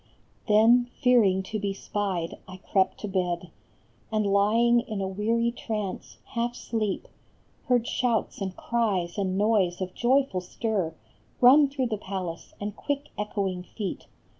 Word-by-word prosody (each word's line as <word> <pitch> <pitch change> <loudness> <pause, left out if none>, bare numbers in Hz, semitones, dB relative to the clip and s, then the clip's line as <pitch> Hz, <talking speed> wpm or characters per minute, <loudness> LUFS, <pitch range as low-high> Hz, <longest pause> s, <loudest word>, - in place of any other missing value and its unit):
Then, 235 +3 +5
fearing 210 -7 +4
to 215 +3 -4
be 200 -1 -2
spied, 195 -5 -3
I 185 0 -9
crept 190 0 0
to 210 - -3
bed; 180 -3 -2 0.6
And 215 -1 +1
lying 230 +4 +4
in 220 -3 -4
a 190 - -1
weary 225 +5 0
trance, 215 -4 -5 0.2
half 240 +1 -1
sleep, 215 -5 -2 0.6
Heard 245 -2 +2
shouts 235 -4 0
and 190 -1 -4
cries 205 -6 -1
and 190 -1 0
noise 200 -4 +2
of 185 -1 -4
joyful 255 -6 +2
stir 185 -3 -2 0.4
Run 275 +3 +7
through 270 -2 -1
the 220 -3 -1
palace, 185 -4 -6
and 205 0 -4
quick 285 0 -3
echoing 195 -3 -2
feet. 195 +2 -6
210 Hz, 140 wpm, -27 LUFS, 190-235 Hz, 0.6 s, Run